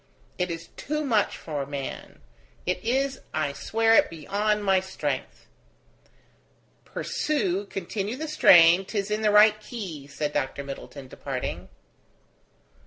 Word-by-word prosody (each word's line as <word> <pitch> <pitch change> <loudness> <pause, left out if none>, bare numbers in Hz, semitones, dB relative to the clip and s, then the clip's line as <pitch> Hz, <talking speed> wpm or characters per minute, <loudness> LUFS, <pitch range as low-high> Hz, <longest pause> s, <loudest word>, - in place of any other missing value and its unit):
It 180 0 0
is 165 0 -6
too 305 +1 -2
much 220 -6 +1
for 150 -3 -4
man. 140 -1 -6 0.4
It 180 0 -1
is, 265 +4 0
I 155 -2 0
swear 225 +9 +2
it, - - +5
beyond 205 +6 -1
my 190 -1 +4
strength." 190 0 -4 1.4
"Pursue, 205 -10 -1
continue 200 +4 -4
the 315 +4 -5
strain; 175 - +7
'tis 200 +1 -3
in 210 +1 0
the 215 - +3
right 210 +1 +6
key," 185 - -7
said 145 +1 -3
Dr. 140 0 -2
Middleton, 140 0 -8
departing. - - -5
195 Hz, 125 wpm, -26 LUFS, 155-220 Hz, 1.4 s, strain